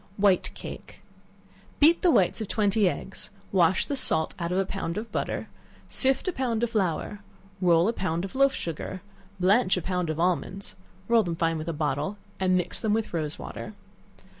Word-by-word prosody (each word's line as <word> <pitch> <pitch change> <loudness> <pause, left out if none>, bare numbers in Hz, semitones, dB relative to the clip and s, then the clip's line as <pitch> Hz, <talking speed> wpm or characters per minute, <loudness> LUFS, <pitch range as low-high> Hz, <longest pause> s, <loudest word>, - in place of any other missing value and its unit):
White 195 -2 +3
Cake. - - -9 0.8
Beat 320 +4 +6
the 360 - +4
whites 200 - +3
of 215 - -3
twenty 205 -2 +2
eggs; 190 - -6 0.2
wash 185 -1 +3
the 285 - -2
salt 160 - +1
out 170 0 -2
of 180 - +1
a 195 - +2
pound 190 -2 -4
of 225 +2 -5
butter; - - -2 0.4
sift 265 +6 +1
a - - +2
pound 240 -5 -1
of 235 - 0
flour, 200 -1 -1 0.4
roll 170 0 +5
a 230 - +1
pound 175 -4 -1
of 195 - -8
loaf 275 0 +3
sugar, 170 +3 -5 0.4
blanch 190 +2 +4
a - - -1
pound 180 -2 -1
of 155 0 -2
almonds; 185 +2 -1 0.3
roll 235 -1 +5
them 175 -5 -2
fine 165 -1 0
with 155 +2 -4
a - - +1
bottle, 150 +5 -1 0.2
and 185 -1 +3
mix 180 0 -1
them 215 -2 +1
with 220 -3 -1
rose 155 -3 -2
water. 65 -1 -7
190 Hz, 190 wpm, -27 LUFS, 170-220 Hz, 0.8 s, Beat